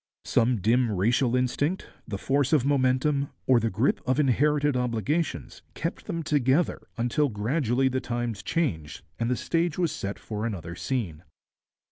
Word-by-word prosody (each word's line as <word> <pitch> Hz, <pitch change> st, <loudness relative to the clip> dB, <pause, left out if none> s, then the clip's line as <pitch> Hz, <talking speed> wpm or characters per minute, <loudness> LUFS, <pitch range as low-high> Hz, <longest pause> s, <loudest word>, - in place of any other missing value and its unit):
Some 120 Hz, -2 st, +2 dB
dim 120 Hz, +3 st, +3 dB
racial 120 Hz, +6 st, +2 dB
instinct, 140 Hz, +8 st, 0 dB, 0.2 s
the 105 Hz, -4 st, -3 dB
force 140 Hz, +6 st, +1 dB
of 140 Hz, -5 st, +4 dB
momentum, 140 Hz, +1 st, +2 dB, 0.2 s
or 130 Hz, -2 st, +5 dB
the 115 Hz, 0 st, 0 dB
grip 110 Hz, +7 st, +1 dB
of 130 Hz, +3 st, +2 dB
inherited 145 Hz, +1 st, +2 dB
obligations, 125 Hz, -, -1 dB
kept 165 Hz, -, -4 dB
them 165 Hz, -1 st, -3 dB
together 145 Hz, +2 st, +1 dB, 0.2 s
until 125 Hz, +5 st, +1 dB
gradually 125 Hz, +4 st, +1 dB
the 130 Hz, 0 st, -1 dB
times 120 Hz, -4 st, -3 dB
changed 90 Hz, -, -2 dB, 0.2 s
and 115 Hz, 0 st, 0 dB
the 125 Hz, -, +2 dB
stage 165 Hz, +4 st, -1 dB
was 175 Hz, -3 st, +1 dB
set 100 Hz, +1 st, -4 dB
for 105 Hz, -1 st, -5 dB
another 90 Hz, -7 st, -4 dB
scene. 90 Hz, -, -3 dB
125 Hz, 150 wpm, -27 LUFS, 115-145 Hz, 0.2 s, or